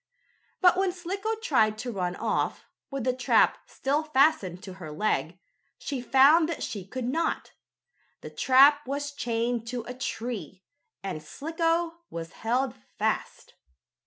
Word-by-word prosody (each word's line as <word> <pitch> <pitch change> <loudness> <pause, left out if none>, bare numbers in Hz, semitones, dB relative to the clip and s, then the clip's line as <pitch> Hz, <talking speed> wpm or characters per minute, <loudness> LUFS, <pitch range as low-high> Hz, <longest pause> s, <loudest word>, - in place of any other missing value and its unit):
But 360 0 +6
when 385 -1 +2
Slicko 390 +5 -3
tried 215 - +3
to 245 +2 -4
run 180 -4 -2
off, - - -1 0.2
with 275 -3 -4
the 255 +1 +1
trap 255 0 +3
still 280 +3 0
fastened 275 - +2
to 190 - -8
her 155 -3 -7
leg, 175 0 -1 0.4
she 275 -4 -4
found 280 +6 +5
that 335 - -3
she 195 -4 -5
could 255 +4 -4
not. 320 +7 -1 0.7
The - - -8
trap 280 +2 +5
was 285 +1 -3
chained 235 -3 -2
to 245 -1 -3
a 245 - -7
tree, 240 -6 -5 0.4
and 185 -5 -4
Slicko 330 - -1
was 165 0 -6
held 245 +5 -1 0.2
fast. - - -2
255 Hz, 140 wpm, -27 LUFS, 215-310 Hz, 0.7 s, But